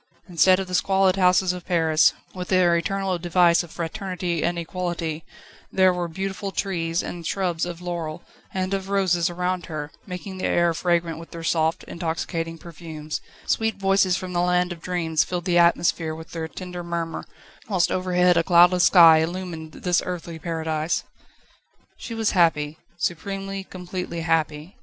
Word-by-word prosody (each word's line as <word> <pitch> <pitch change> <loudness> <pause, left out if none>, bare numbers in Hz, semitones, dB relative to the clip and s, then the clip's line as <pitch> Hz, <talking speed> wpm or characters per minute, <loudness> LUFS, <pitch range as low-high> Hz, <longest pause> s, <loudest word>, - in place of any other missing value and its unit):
Instead 185 +1 +4
of 190 - -2
the 180 - -8
squalid 190 0 +3
houses 180 -1 +3
of 180 -1 -7
Paris, 160 -3 +3 0.2
with 180 -1 -6
their 180 -2 +4
eternal 190 +1 -1
device 175 0 +4
of 175 - -9
Fraternity 175 -1 -3
and 175 - 0
Equality, 170 -2 -3 0.5
there 185 -1 +4
were 175 -1 -2
beautiful 195 +3 -4
trees 170 -4 -1
and 175 -1 -6
shrubs 175 -3 -1
of 175 0 -7
laurel 170 -3 -4 0.3
and 185 0 -2
of 195 0 -3
roses 180 -4 +2
around 180 +1 -2
her, 150 -3 -5 0.2
making 185 +1 -7
the - - -2
air 170 -1 +2
fragrant 170 -1 0
with 165 - -11
their 165 -1 -8
soft, 160 0 +1
intoxicating 165 0 -4
perfumes; 160 -2 -7 0.2
sweet 225 -1 0
voices 195 -1 +2
from 185 -1 -6
the 175 - +1
land 180 0 +2
of 170 -2 -7
dreams 165 -3 0
filled 180 -1 -4
the 175 -2 +3
atmosphere 170 -2 +2
with 160 0 -11
their 165 -1 -4
tender 180 +1 -7
murmur, 170 -1 -3 0.5
whilst 185 -4 +2
overhead 180 -1 +2
a 165 - +4
cloudless 175 +1 +5
sky 165 -3 +8
illumined 165 -1 -4
this 175 +1 0
earthly 170 -2 -5
paradise. 160 -1 -2 0.9
She 230 - -7
was 225 -1 +1
happy 160 -4 +2 0.2
supremely, 195 +3 -3
completely 180 -2 -5
happy. 160 +1 -1
175 Hz, 160 wpm, -24 LUFS, 165-185 Hz, 0.9 s, sky